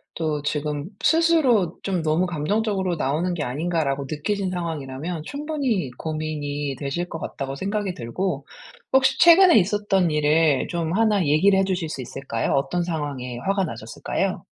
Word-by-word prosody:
또 155 -3 -1
지금 150 +2 -2
스스로 310 - +3
'좀 185 -4 -1
너무 160 +3 +1
감정적으로 190 +3 -1
나오는 155 +5 -1
게 160 -4 -2
아닌가?'라고 145 0 -1
느끼신 190 +6 -2
상황이라면 160 -1 -4
'충분히 280 - -2
고민이 150 -3 -3
되실 150 +5 -3
것 165 - -6
같다.'고 135 -2 -5
생각이 200 +4 -2
들고 140 +3 -3 0.5
혹시 265 0 +4
최근에 345 -1 +8
있었던 195 -2 +1
일을 150 -1 +3
좀 170 -2 -2
1 210 -2 +3
얘기를 190 +7 +4
해 - - +3
주실 180 -4 -2
수 135 - -5
있을까요? 125 -2 -3
어떤 175 +6 0
상황에 145 -7 -4
화가 195 -1 +2
나셨을까요? 115 -6 -3
165 Hz, 340 characters per minute, -23 LUFS, 145-195 Hz, 0.5 s, 최근에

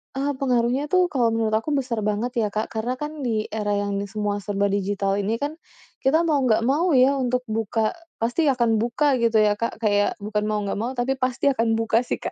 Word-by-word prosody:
Eee, 275 +2 0
pengaruhnya 255 +2 +1
tuh 365 +2 +2
kalau 250 -4 +2
menurut 225 -1 0
aku 290 +6 -2
besar 255 -5 -1
banget 210 +3 -1
ya 215 - +1
Kak 210 +1 -3
karena 230 +3 -2
kan 300 +3 -6
di 225 -5 -2
era 210 -1 -1
yang 200 0 -1
semua 205 0 -2
serba 200 +1 -1
digital 200 0 0
ini 205 +3 0
kan, 290 +7 -4 0.4
kita 310 +5 +3
mau 310 -4 +2
nggak 230 -4 +2
mau 295 +6 +2
ya 265 +2 +4
untuk 250 0 0
buka 220 0 0 0.2
pasti 240 +8 0
akan 235 -5 +2
buka 255 +4 +1
gitu 230 -1 +1
ya 205 0 +1
Kak 230 - -2
kayak 205 -1 +2
bukan 210 0 -1
mau 215 0 0
nggak 200 0 -3
mau 235 +4 -2
tapi 260 +2 -1
pasti 255 +2 +1
akan 230 -3 +1
buka 225 0 +2
sih 245 - -2
Kak - - -3
230 Hz, 215 wpm, -23 LUFS, 210-265 Hz, 0.4 s, ya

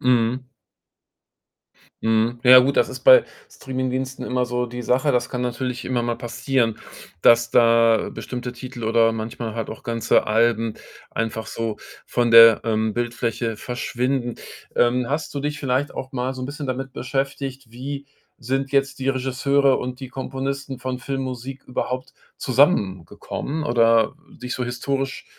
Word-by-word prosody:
Mhm. 125 +1 +1 1.6
Mhm. 115 +2 +1
Ja 130 0 +10
gut, 135 +2 +2
das - - +3
ist - - -7
bei - - +8 0.3
Streaming-Diensten 130 - -4
immer 125 0 0
so 125 0 -2
die 125 +1 -6
Sache. 130 +4 +2
Das 125 0 0
kann 125 - -3
natürlich 125 +1 -3
immer 125 -2 0
mal 120 0 -1
passieren, 120 -1 -1 0.4
dass 115 0 +5
da 115 -1 +4
bestimmte 125 -1 -6
Titel 120 -1 -8
oder 115 0 +3
manchmal 115 0 -5
halt 115 -2 -4
auch 110 - -9
ganze 115 -1 +1
Alben 115 0 +2 0.4
einfach 110 0 -3
so 115 -2 -3 0.3
von 120 -1 0
der, 115 -1 +9
ähm, 110 -1 0
Bildfläche 120 -1 -2
verschwinden. 125 +1 -2 0.4
Ähm, 120 0 +2
hast 150 +2 -2
du 140 - -2
dich 145 0 -3
vielleicht 135 +1 -1
auch 130 +1 -6
mal 130 +1 -2
so 130 - -7
'n 130 - -3
bisschen 145 0 -6
damit 130 +1 -4
beschäftigt, 135 0 -4
wie 140 +4 -6 0.3
sind 135 +2 -2
jetzt 135 -1 +1
die 135 - -2
Regisseure 135 +1 +2
und 125 0 -5
die 130 - -7
Komponisten 135 +1 -4
von 130 0 -4
Filmmusik 130 0 -5
überhaupt 125 0 -4 0.2
zusammengekommen 130 - 0
oder 115 -3 +3 0.3
dich 125 0 -4
so 130 - -3
historisch 135 +3 -3
125 Hz, 150 wpm, -22 LUFS, 115-135 Hz, 1.6 s, Ja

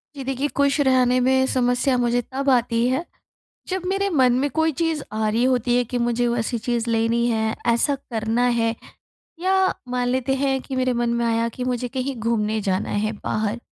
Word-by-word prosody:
जी 275 - -6
देखिए, 270 +2 -1
खुश 280 +1 +2
रहने 255 -2 +3
में 260 +1 +3
समस्या 250 +1 +1
मुझे 245 0 +1
तब 275 +1 -1
आती 240 -2 +2
है 265 +7 -1 0.6
जब 375 0 -2
मेरे 395 +1 0
मन 260 -8 +3
में 285 +2 0
कोई 320 0 +1
चीज़ 325 -3 0
आ 215 0 0
रही 225 +3 +1
होती 250 -1 +2
है 245 - +2
कि 250 - 0
मुझे 240 0 +1
वैसी 235 0 -1
चीज़ 235 0 -2
लेनी 230 +1 +1
है, 220 -1 0
ऐसा 235 +4 +2
करना 230 -2 -1
है 230 0 +1 0.7
या 380 +1 +2
मान 245 0 -1
लेते 260 +1 0
हैं 270 0 0
कि 265 - -6
मेरे 255 0 +1
मन 240 -1 0
में 235 0 0
आया 230 0 +1
कि 250 - -3
मुझे 250 -1 -2
कहीं 265 +2 -3
घूमने 220 -1 -1
जाना 190 -2 -1
है 215 +1 -1
बाहर 215 +2 -1
245 Hz, 195 wpm, -22 LUFS, 230-270 Hz, 0.7 s, रहने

